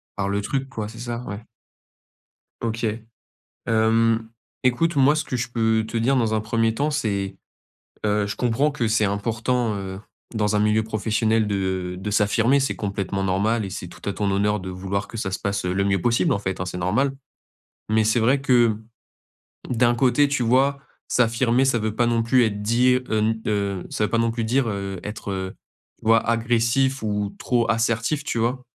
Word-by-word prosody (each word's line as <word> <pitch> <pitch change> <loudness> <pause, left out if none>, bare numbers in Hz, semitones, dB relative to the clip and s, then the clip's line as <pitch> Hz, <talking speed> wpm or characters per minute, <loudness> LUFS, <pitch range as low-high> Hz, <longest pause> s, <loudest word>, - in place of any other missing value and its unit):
par 100 -1 -1
le 100 +1 0
truc 135 +5 -2
quoi, 110 -5 -4
c'est 115 +1 -11
ça? 120 0 -4
Ouais. 100 +3 -6 1.2
OK. 115 0 -2 0.8
Hem, 115 0 +2 0.3
écoute 145 +6 +1
moi 140 +2 +5
ce 155 0 -1
que 130 - -3
je 115 -1 -2
peux 110 -2 +1
te 110 - -5
dire 130 +4 +2
dans 115 -3 +1
un 110 - +1
premier 115 +1 0
temps 145 +5 0
c'est, 100 -9 -2 0.7
heu, 105 -1 +1
je 100 - -4
comprends 125 +5 +1
que 120 -6 -1
c'est 110 -1 +2
important, 110 +3 -1
heu, 95 -1 -6 0.4
dans 105 -1 +1
un - - +2
milieu 105 +1 +2
professionnel 110 0 0
de 95 -3 -2
de 100 +3 -4
s'affirmer 110 +6 +3
c'est 135 - -1
complètement 100 -1 -3
normal 105 +4 +1
et - - -5
c'est 90 -2 -6
tout 90 +2 -12
à - - -2
ton 100 0 -1
honneur 105 +2 +1
de 95 0 -6
vouloir 95 +2 -3
que 115 - -11
ça 95 -3 -3
se 95 - -3
passe, 100 0 -2
heu, 90 - 0
le 100 +1 +1
mieux 95 -2 +1
possible 120 - +2
en 100 - -1
fait, 95 -2 -3
hein, 90 - -2
c'est 90 0 -5
normal. 110 +11 +1 0.8
Mais 110 0 +3
c'est 110 +2 +2
vrai 130 +5 +3
que 120 -5 +4 0.9
d'un 120 0 +3
côté, 135 +3 +3
tu 140 -3 0
vois, 135 +4 +3 0.3
s'affirmer 120 +1 +2
ça 130 -3 +2
veut 110 0 -2
pas 120 0 +2
non 115 -1 +1
plus 125 +2 +4
être 105 -2 -2
dit, 120 +4 +3
heu, 125 - -1
n, 110 +1 0
heu, 100 -3 -1
ça 105 - 0
veut - - -4
pas 115 - +1
non 115 0 +2
plus 115 -1 -2
dire, 125 +2 +1
heu, 100 -2 -4
être, 105 -1 -6
heu, 95 -1 -4 0.5
tu - - -18
vois 115 0 +6
agressif 115 +3 +1
ou 105 -1 -2
trop 120 -3 0
assertif, 115 +6 0
tu 120 - -3
vois? 125 +3 -1
110 Hz, 200 wpm, -23 LUFS, 100-120 Hz, 1.2 s, vois